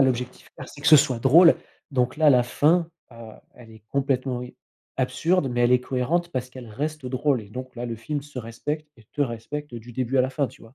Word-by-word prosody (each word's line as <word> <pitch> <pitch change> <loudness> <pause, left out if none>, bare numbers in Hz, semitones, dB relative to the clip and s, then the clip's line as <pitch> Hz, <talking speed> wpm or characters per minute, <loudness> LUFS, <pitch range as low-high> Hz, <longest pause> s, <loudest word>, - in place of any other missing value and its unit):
l'objectif 125 -1 0
clair, - - -8
c'est 145 - -13
que 150 - -4
ce 155 - +10
soit 130 -3 +2
drôle, 165 +8 +7 0.3
donc 130 0 0
là, 155 -1 +5
la 125 -2 +5
fin, 160 +7 +2 0.2
heu, 115 -1 -11 0.2
elle 115 -2 -15
est 110 -1 -16
complètement 135 -2 -1
i 125 - -10 0.4
absurde, 160 +4 +1
mais 120 0 -1
elle 120 +1 +4
est 125 - +4
cohérente 155 +8 -1
parce 130 -3 -3
qu'elle 125 -3 -10
reste 150 +5 -4
drôle 130 -1 0
et 100 - -15
donc 130 +2 -8
là, 120 - -4
le 115 -1 -4
film 145 +6 -4
se 145 -2 -10
respecte 145 +7 -5
et 115 - -19
te 145 - -6
respecte 130 +3 -5
du 120 +1 -9
début 130 +2 -1
à - - +6
la 130 - -1
fin, 140 0 0
tu - - -15
vois? 115 +3 -16
130 Hz, 235 wpm, -24 LUFS, 120-145 Hz, 0.4 s, ce